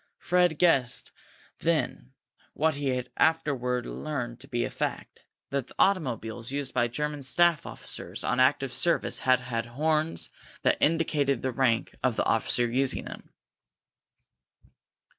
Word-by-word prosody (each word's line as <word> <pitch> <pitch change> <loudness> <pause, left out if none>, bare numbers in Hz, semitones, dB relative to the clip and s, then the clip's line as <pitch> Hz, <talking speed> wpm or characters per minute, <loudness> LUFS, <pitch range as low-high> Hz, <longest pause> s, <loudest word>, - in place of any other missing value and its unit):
Fred 180 -3 +2
guessed 135 -8 +2 0.5
then 150 -5 -1 0.4
what 160 +1 +1
he 135 -3 -1
afterward 125 -6 +1
learned 125 -6 -4
to 135 - -9
be 120 -2 -1
a - - -5
fact; - - -4 0.3
that 140 -3 -1
the - - -16
automobiles 120 - 0
used 140 -1 -3
by 120 -1 +2
the - - -14
German 150 +1 -2
staff 170 +4 +3
officers - - -6
on 125 - 0
active 130 0 +3
service 165 +7 +1
had 130 -1 +3
horns 150 +7 -1 0.3
that - - +3
indicated 150 -3 +1
the 130 - 0
rank 120 -2 +1
of 125 -3 +1
the - - 0
officer 115 +2 +2
using 130 +3 +1
them. - - -9
135 Hz, 135 wpm, -28 LUFS, 125-155 Hz, 0.5 s, staff